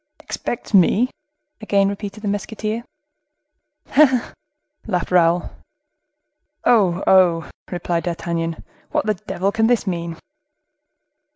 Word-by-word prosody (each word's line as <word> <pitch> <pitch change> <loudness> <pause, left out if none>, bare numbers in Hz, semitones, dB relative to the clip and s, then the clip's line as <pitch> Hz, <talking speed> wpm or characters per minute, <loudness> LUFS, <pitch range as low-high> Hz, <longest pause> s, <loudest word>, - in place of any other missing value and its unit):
"Expects 265 -7 -5
me?" 205 +6 +4 0.5
again 200 -2 +2
repeated 200 +1 -5
the - - -2
musketeer. 215 +2 -3 1.1
"He, 300 - +8
he, 260 -3 +4
he!" - - -2 0.7
laughed 180 -1 -1
Raoul. 175 -1 +3 1.1
"Oh, 190 -6 +3
oh!" 175 -3 +4 0.2
replied 175 -1 -2
D'Artagnan. 165 -1 -3 0.3
"What - - 0
the 215 - +2
devil 200 -1 -2
can 225 +1 +2
this 240 -3 +2
mean?" 170 -3 -3
195 Hz, 110 wpm, -21 LUFS, 175-215 Hz, 1.1 s, He